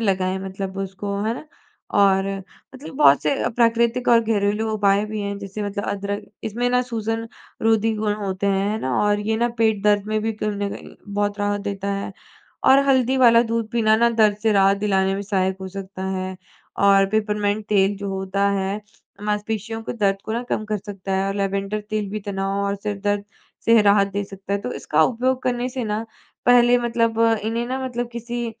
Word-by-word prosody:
लगाएँ 190 -3 0
मतलब 190 0 -5
उसको 195 +1 -4
है 225 +2 0
ना? 305 - -9 0.5
और 195 -1 +4 0.5
मतलब 275 +2 -10
बहुत 145 - +6
से 150 - +1 0.2
प्राकृतिक 235 +1 +2
और 235 -1 +6
घरेलू 215 0 0
उपाय 205 -1 +2
भी 215 0 -4
हैं। 200 0 -3
जैसे 200 +1 -6
मतलब 205 0 -3
अदरक 200 0 -3 0.2
इसमें 240 +3 -1
ना 250 - +3
सूजन-रोधी 225 -1 -1
गुण 210 -1 0
होते 200 -2 -3
हैं, 195 +1 +1
है 215 - -1
ना? 130 -1 -1
और 205 0 +2
ये 220 +1 -1
ना 235 +1 +1
पेट 220 -3 +2
दर्द 205 -1 +3
में 215 0 0
भी 225 +1 -1
कहीं 215 0 -2
न 205 -1 -2
कहीं - - -11 0.2
बहुत 205 0 -1
राहत 205 0 0
देता 200 0 -3
है, 195 0 -4 0.5
और 265 - +7
हल्दी 260 -1 +3
वाला 235 -2 +6
दूध 230 -1 -2
पीना 220 -2 +3
ना 235 +1 +4
दर्द 215 -3 +3
से 220 - +3
राहत 195 0 +4
दिलाने 195 -2 +1
में 200 - -3
सहायक 190 -2 0
हो 190 - -5
सकता 190 0 -7
है। 185 0 -4 0.5
और 195 0 +6
पिपरमिंट 210 -1 0
तेल 200 -1 +3
जो 200 0 -5
होता 195 +1 0
है, 195 +1 -1 0.4
मांसपेशियों 215 +2 -3
को - - -4
दर्द 200 -4 +1
को 220 - -4
ना 235 +2 -1
कम 215 - -1
कर 215 0 -2
सकता 195 -1 -6
है 195 +1 0
और 195 - -2
लैवेंडर 200 +1 -1
तेल 215 -2 -1
भी 215 +1 -4
तनाव 195 0 -2
और 200 0 0
सिर 205 0 -4
दर्द 205 0 0 0.4
से 230 -1 +6
राहत 200 -1 +5
दे 205 0 -2
सकता 195 0 -8
है। 200 - +1
तो 245 - -4
इसका - - +1
उपयोग 255 +2 +1
करने 245 0 -1
से 255 -2 -4
ना 215 +1 -2 0.4
पहले 245 0 +6
मतलब 230 -1 0 0.3
इन्हें 230 +2 -1
ना 260 +2 -2
मतलब 245 -1 -3
किसी 235 0 -4
210 Hz, 200 wpm, -22 LUFS, 195-225 Hz, 0.5 s, और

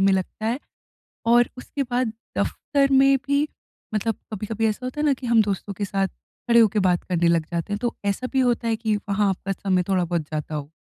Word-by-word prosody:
में 195 0 +4
लगता 190 +3 -2
है? 235 +3 0 0.7
और 240 +1 +5
उसके 275 +2 -3
बाद 250 0 0 0.3
दफ़्तर 275 -2 +1
में 270 0 +6
भी 285 +2 +2 0.5
मतलब 220 +1 0 0.2
कभी-कभी 220 +2 -1
ऐसा 215 +4 -2
होता 255 +4 -5
है 305 - +1
ना 285 - +4
कि 250 -2 -6
हम 230 -1 +5
दोस्तों 200 0 -3
के 200 +2 -3
साथ 195 0 0
खड़े 235 +4 0
होके 215 -2 +4
बात 180 -2 +2
करने 175 -2 +1
लग 170 -2 +3
जाते 170 +4 -2
हैं, - - 0
तो 240 0 -2
ऐसा 200 +6 -1
भी 265 - +3
होता 240 -2 +2
है 225 - +2
कि 220 -1 0
वहाँ 200 0 0
आपका 190 +1 -3
समय 185 -1 +1
थोड़ा 185 -2 +2
बहुत 170 -1 -1
जाता 155 0 -3
हो? 145 -1 -5
215 Hz, 220 wpm, -24 LUFS, 190-245 Hz, 0.7 s, में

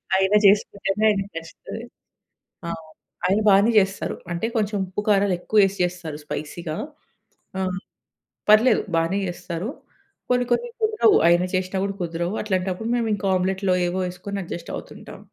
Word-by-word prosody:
అయినా 190 +2 +3
చేసుకుంటేనే 200 0 +2
ఆయనకి 200 -1 0
నచ్చుతది. 165 +7 -8 0.8
ఆ! - - -3 0.6
ఆయన 195 +3 +2
బానే 200 +3 +5
చేస్తారు. 195 0 -2 0.2
అంటే 170 +6 -1
కొంచెం 210 -1 0
ఉప్పు 185 +2 -4
కారాలు 200 -2 +3
ఎక్కువ 215 +4 0
ఎసి 195 +1 -5
చేస్తారు. 175 -4 -4
స్పైసీగా 155 +2 -5 0.8
ఆ! - - -1 0.9
పర్లేదు 215 +4 +6
బానే 165 +4 +1
చేస్తారు. 175 +2 -5 0.6
కొన్ని 245 0 +2
కొన్ని 480 - +1
కుదరవు. 435 -1 +4
ఆయన 175 +1 +5
చేసిన 185 +1 -2
కూడా 200 0 -3
కుదరవు. 170 +3 -2
అట్లాంటప్పుడు 190 +1 -2
మేము 235 -2 0
ఇంకా 200 0 -3
ఆమ్లెట్‌లో 190 0 +1
ఏవో 185 +2 -1
ఎసుకొని 195 +3 -6
అడ్జస్ట్ 170 0 -7
అవుతుంటాం. - - -10
195 Hz, 135 wpm, -23 LUFS, 175-210 Hz, 0.9 s, పర్లేదు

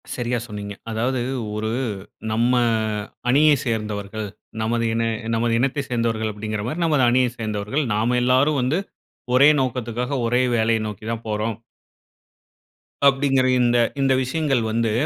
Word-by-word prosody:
சரியா 120 0 -1
சொன்னீங்க. 100 -1 -6 0.2
அதாவது 120 +3 -1 0.3
ஒரு 110 +1 -2 0.6
நம்ம 120 +3 +2 0.8
அணியே 150 +3 +5
சேர்ந்தவர்கள், 105 -2 -3 0.3
நமது 115 +1 0
இன 115 0 0 0.3
நமது 115 0 +1
இனத்தை 135 +2 0
சேர்ந்தவர்கள் 115 -2 0
அப்பிடிங்கிறமாரி 110 +7 -4
நமது 150 -5 +2
அணியைச் 125 -1 +1
சேர்ந்தவர்கள். 110 +6 -2
நாம 115 +4 +1
எல்லாரும் 135 +3 +3
வந்து 135 +8 +1 0.6
ஒரே 140 +3 +7
நோக்கத்துக்காக 125 +1 -2
ஒரே 120 +2 +2
வேலைய 115 0 +2
நோக்கி 105 0 -8
தான் 115 0 -4
போறோம். 110 0 -2 1.5
அப்டீன்கிற 135 -1 +3
இந்த 120 0 +3 0.2
இந்த 135 -1 +3
விஷயங்கள் 135 -2 0
வந்து, 115 0 +1
120 Hz, 125 wpm, -22 LUFS, 110-130 Hz, 1.5 s, ஒரே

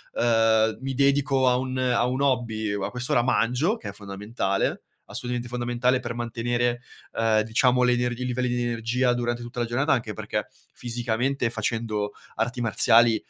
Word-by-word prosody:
ehm, 115 -1 +3
mi 135 0 -3
dedico 140 -1 +3
a 125 - +4
un 130 0 -3
a 125 -2 +2
un 130 +2 -1
hobby, 115 -6 0
uhm, 100 -1 -2
a - - -1
quest'ora 125 -1 0
mangio" 125 - +1
che 225 - -7
è - - -5
fondamentale, 100 0 -2 0.2
assolutamente 120 0 -4
fondamentale 125 +1 0
per - - -5
mantenere, 120 +1 -1 0.3
ehm, 110 -1 +2
diciamo, 125 +3 +3
le 125 - +4
ener 120 0 0
i 125 +1 -5
livelli 125 0 -1
di 120 0 -1
energia 120 +2 +1
durante 120 0 -2
tutta 120 +1 -7
la 120 - +1
giornata, 130 +6 0
anche 115 -4 -2
perché - - -3 0.3
fisicamente 120 +1 -1
facendo 110 -2 -2 0.2
arti 120 0 -2
marziali, 115 0 +4
120 Hz, 165 wpm, -25 LUFS, 115-125 Hz, 0.3 s, a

